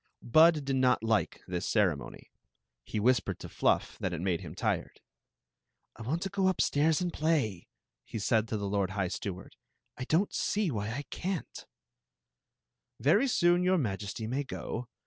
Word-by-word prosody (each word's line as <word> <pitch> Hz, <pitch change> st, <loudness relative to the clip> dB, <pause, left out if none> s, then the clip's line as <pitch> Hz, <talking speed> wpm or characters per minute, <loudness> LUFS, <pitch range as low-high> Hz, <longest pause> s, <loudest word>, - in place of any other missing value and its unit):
Bud 155 Hz, +3 st, +5 dB
did 135 Hz, -1 st, 0 dB
not 125 Hz, -3 st, +3 dB
like 110 Hz, -1 st, 0 dB
this 90 Hz, -1 st, -3 dB
ceremony. 90 Hz, -, -1 dB, 0.5 s
He 110 Hz, -, -3 dB
whispered 125 Hz, +3 st, +2 dB
to -, -, -8 dB
Fluff -, -, 0 dB
that 90 Hz, -, -2 dB
it 85 Hz, -, -3 dB
made 90 Hz, -1 st, -1 dB
him -, -, -8 dB
tired. -, -, -2 dB, 0.5 s
" -, -, -54 dB
I -, -, -11 dB
want 150 Hz, +10 st, -2 dB
to 195 Hz, -, -2 dB
go 195 Hz, -1 st, +1 dB
upstairs 160 Hz, -3 st, +2 dB
and 175 Hz, -1 st, -2 dB
play," 145 Hz, -, 0 dB, 0.4 s
he -, -, -7 dB
said 110 Hz, +1 st, +1 dB
to 110 Hz, -, -2 dB
the 100 Hz, -1 st, -3 dB
lord 100 Hz, -1 st, 0 dB
high 95 Hz, -2 st, -1 dB
steward. 95 Hz, -1 st, -6 dB, 0.2 s
" -, -, -51 dB
I 130 Hz, -, -3 dB
don't 170 Hz, +8 st, +1 dB
see 205 Hz, -5 st, 0 dB
why 105 Hz, -3 st, -3 dB
I 130 Hz, +6 st, -4 dB
can't" 185 Hz, -2 st, -4 dB, 1.3 s
"Very 170 Hz, -, +4 dB
soon 175 Hz, -7 st, +3 dB
your 185 Hz, +1 st, +3 dB
Majesty 105 Hz, -, -3 dB
may 130 Hz, +6 st, -1 dB
go. 125 Hz, -2 st, -5 dB
125 Hz, 170 wpm, -30 LUFS, 100-165 Hz, 1.3 s, Bud